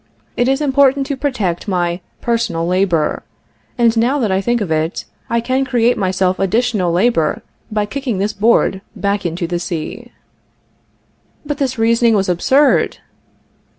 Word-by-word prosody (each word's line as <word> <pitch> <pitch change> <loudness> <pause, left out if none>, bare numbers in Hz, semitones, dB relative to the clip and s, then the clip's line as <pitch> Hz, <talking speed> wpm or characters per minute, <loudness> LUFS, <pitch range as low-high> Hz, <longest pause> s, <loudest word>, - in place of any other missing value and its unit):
It 245 - +1
is 270 +2 +1
important 275 -1 +3
to 280 0 -3
protect 230 - -2
my 175 -2 -1 0.2
personal 230 -8 -1
labor, 180 -3 +1 0.6
and 235 -1 +3
now 240 +5 +2
that 225 -8 0
I 190 +1 +1
think 240 +3 0
of 195 -7 -3
it, 160 +2 -1 0.2
I 235 - +1
can 255 +3 0
create 245 -2 +2
myself 185 -1 0
additional 205 -2 +1
labor 175 -4 +1 0.3
by 210 -1 0
kicking 255 -1 -3
this 205 +3 -1
board 200 -2 +2
back 200 -2 -1
into 170 +1 -3
the 175 +1 -2
sea." 170 -3 -5 1.3
But 295 0 -4
this 260 -3 -1
reasoning 230 0 +3
was 195 -2 +1
absurd! 265 - +2
215 Hz, 150 wpm, -17 LUFS, 185-245 Hz, 1.3 s, important